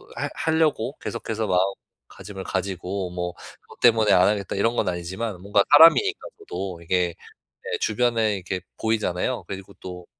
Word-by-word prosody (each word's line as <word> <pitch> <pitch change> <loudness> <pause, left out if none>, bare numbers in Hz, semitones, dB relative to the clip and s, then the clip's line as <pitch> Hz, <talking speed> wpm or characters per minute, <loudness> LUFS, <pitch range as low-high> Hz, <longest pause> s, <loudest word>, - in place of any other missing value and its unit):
할 - - -3
하려고 155 -5 0
계속해서 110 -1 -4
마음가짐을 95 +1 -3
가지고 95 0 -3
뭐 90 0 -4 0.3
'그것 - - -18
때문에 110 -3 +5
안 90 - +5
하겠다.' 100 -2 -2
이런 115 +4 +1
건 105 - +1
아니지만 90 +4 -4
뭔가 100 +1 +2
사람이니까 165 - +7 0.2
저도 95 - -6
이게 90 0 0 0.6
예, - - +1
주변에 110 -1 +1
이렇게 95 0 -4 0.2
보이잖아요. 110 +1 -1
그리고 95 0 -8
또 90 -1 -8
100 Hz, 355 characters per minute, -24 LUFS, 90-115 Hz, 0.6 s, 사람이니까